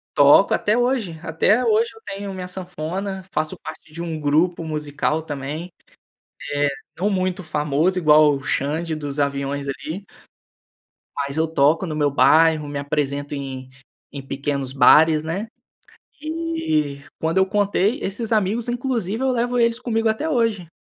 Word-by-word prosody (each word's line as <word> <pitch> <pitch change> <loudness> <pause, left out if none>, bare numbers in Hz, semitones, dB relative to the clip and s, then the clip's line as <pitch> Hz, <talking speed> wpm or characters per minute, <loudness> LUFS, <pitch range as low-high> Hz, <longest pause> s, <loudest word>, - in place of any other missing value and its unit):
Toco 145 +7 +6
até 210 +3 +1
hoje. 240 -10 0
Até 170 +8 +2
hoje 225 +1 +3
eu 225 - -17
tenho 200 0 -5
minha 185 -1 -6
sanfona, 185 +1 -5
faço 155 +1 -2
parte 160 0 -10
de 170 - -6
um 165 -2 -4
grupo 155 +4 +1
musical 150 0 -2
também. 150 +3 -5 0.8
Eh, 145 0 +2 0.3
não 200 - +1
muito 185 -1 -1
famoso 155 +3 0
igual 155 -3 +6
o 135 - -7
Xand 150 +6 -1
dos 145 -1 -5
Aviões, 140 0 -1
ali 160 +7 -5 1.1
mas 140 +1 -3
eu 160 - +2
toco 160 +3 +2
no 155 -3 -4
meu 145 -2 +1
bairro, 160 +1 +4
me 145 0 -4
apresento 145 0 -2
em 130 -2 -6 0.4
em 140 - -6
pequenos 140 -1 -3
bares, 155 +3 +5
né. 170 +7 -3 0.8
E 310 - -2 0.2
quando 160 +3 -1
eu 190 - +5
contei, 205 +3 +1
esses 215 +4 -3
amigos, 215 +2 +1
inclusive, 240 -3 -2
eu 265 - +2
levo 245 0 0
eles 230 0 +2
comigo 225 -2 0
até 220 +8 -1
hoje. 230 - 0
165 Hz, 150 wpm, -22 LUFS, 145-205 Hz, 1.1 s, Toco